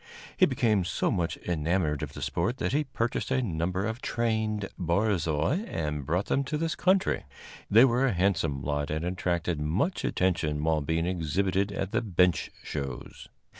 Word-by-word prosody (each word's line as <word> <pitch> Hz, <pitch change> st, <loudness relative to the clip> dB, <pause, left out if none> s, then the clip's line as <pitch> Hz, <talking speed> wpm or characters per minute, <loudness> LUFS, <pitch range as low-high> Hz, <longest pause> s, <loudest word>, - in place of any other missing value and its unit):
He 185 Hz, -, +5 dB
became 115 Hz, -7 st, +2 dB
so 90 Hz, -, 0 dB
much 90 Hz, -6 st, -1 dB
enamored 80 Hz, -2 st, 0 dB
of -, -, -5 dB
the -, -, -6 dB
sport 95 Hz, +10 st, -1 dB
that -, -, -1 dB
he 150 Hz, +1 st, +2 dB
purchased 120 Hz, -2 st, -2 dB
a 130 Hz, -1 st, +1 dB
number 90 Hz, 0 st, -1 dB
of 110 Hz, +3 st, -3 dB
trained 110 Hz, -3 st, -1 dB
barzois 90 Hz, -, +1 dB
and 75 Hz, -3 st, -3 dB
brought 90 Hz, +5 st, +1 dB
them 140 Hz, -, +1 dB
to 150 Hz, +3 st, -2 dB
this 165 Hz, +1 st, -1 dB
country. 185 Hz, +1 st, +2 dB, 0.5 s
They 115 Hz, +5 st, +8 dB
were 130 Hz, +1 st, +2 dB
a 120 Hz, -, +1 dB
handsome 85 Hz, -7 st, +1 dB
lot 75 Hz, +1 st, -1 dB
and 80 Hz, +2 st, -2 dB
attracted 90 Hz, -3 st, -1 dB
much 90 Hz, -, 0 dB
attention 80 Hz, -5 st, 0 dB
while 80 Hz, -1 st, +2 dB
being 80 Hz, +3 st, 0 dB
exhibited 95 Hz, +3 st, 0 dB
at 95 Hz, -1 st, -3 dB
the -, -, +1 dB
bench 90 Hz, -5 st, +2 dB
shows. 70 Hz, -4 st, -6 dB
90 Hz, 170 wpm, -28 LUFS, 80-110 Hz, 0.5 s, They